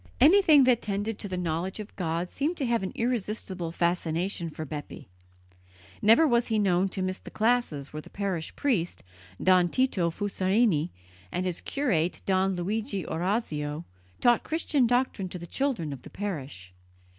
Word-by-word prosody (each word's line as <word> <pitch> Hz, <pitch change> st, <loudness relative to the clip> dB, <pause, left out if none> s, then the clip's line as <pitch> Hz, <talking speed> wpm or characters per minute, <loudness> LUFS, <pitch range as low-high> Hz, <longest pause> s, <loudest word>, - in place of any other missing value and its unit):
Anything 310 Hz, 0 st, +7 dB
that 250 Hz, -2 st, +4 dB
tended 205 Hz, +1 st, -2 dB
to -, -, -5 dB
the 185 Hz, -1 st, -4 dB
knowledge 175 Hz, +3 st, -2 dB
of 210 Hz, 0 st, -8 dB
God 170 Hz, 0 st, -2 dB
seemed 310 Hz, +6 st, -1 dB
to 275 Hz, -, -1 dB
have 235 Hz, -2 st, +1 dB
an 190 Hz, -, -3 dB
irresistible 210 Hz, -7 st, -2 dB
fascination 170 Hz, +1 st, 0 dB
for 155 Hz, 0 st, -6 dB
Bepi. 145 Hz, 0 st, -7 dB, 0.9 s
Never 230 Hz, +10 st, +6 dB
was 240 Hz, -3 st, +2 dB
he 220 Hz, -, +1 dB
known 190 Hz, -2 st, +2 dB
to 190 Hz, 0 st, -3 dB
miss 185 Hz, 0 st, -2 dB
the -, -, -11 dB
classes 220 Hz, -, 0 dB
where 155 Hz, -, -5 dB
the -, -, -14 dB
parish 190 Hz, -5 st, -3 dB
priest, 215 Hz, -, 0 dB, 0.4 s
Don 185 Hz, -1 st, +5 dB
Tito 210 Hz, -9 st, +1 dB
Fusarini, 190 Hz, -2 st, +1 dB, 0.4 s
and 180 Hz, -, -2 dB
his 180 Hz, -2 st, -3 dB
curate, 185 Hz, -, 0 dB
Don 190 Hz, 0 st, +2 dB
Luigi 200 Hz, -, -2 dB
Orazio, 160 Hz, -4 st, -2 dB, 0.3 s
taught 240 Hz, -2 st, +4 dB
Christian 305 Hz, -5 st, +1 dB
doctrine 245 Hz, -6 st, 0 dB
to 180 Hz, -, -6 dB
the 170 Hz, -, -8 dB
children 225 Hz, -, -1 dB
of 135 Hz, -, -9 dB
the -, -, -11 dB
parish. 135 Hz, -, -6 dB
190 Hz, 160 wpm, -28 LUFS, 170-235 Hz, 0.9 s, Anything